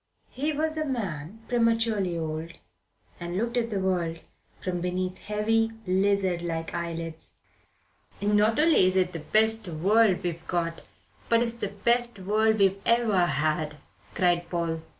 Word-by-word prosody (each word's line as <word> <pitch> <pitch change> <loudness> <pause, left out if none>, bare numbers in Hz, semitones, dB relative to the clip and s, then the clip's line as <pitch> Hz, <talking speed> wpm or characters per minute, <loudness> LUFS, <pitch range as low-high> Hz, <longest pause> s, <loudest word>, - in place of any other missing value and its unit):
He 290 +4 -1
was 315 +1 -1
a - - +1
man 210 - -4
prematurely 225 -6 +1
old, 160 +1 -4 0.7
and 175 +1 -4
looked 235 +3 -1
at 235 -1 0
the 205 -3 -2
world 175 -3 -1 0.4
from 180 -1 -3
beneath 180 +1 -2
heavy, 225 +2 0
lizard 190 -1 +1
like 165 -1 -4
eyelids. 165 -1 -5 0.8
"Not 210 +2 +2
only 305 - +5
is 185 - 0
it 185 -1 +2
the 165 - -4
best 220 +6 +2
world 195 +4 +3
we've 170 -2 -4
got, 170 -2 -2 0.5
but 230 0 +4
it's 230 -1 -2
the 235 -3 -3
best 235 +3 +1
world 215 +3 +2
we've 195 -1 +2
ever 220 -7 +3
had," 150 +1 -1 0.4
cried 175 -2 +1
Paul. 165 -2 -2
190 Hz, 145 wpm, -27 LUFS, 170-225 Hz, 0.8 s, only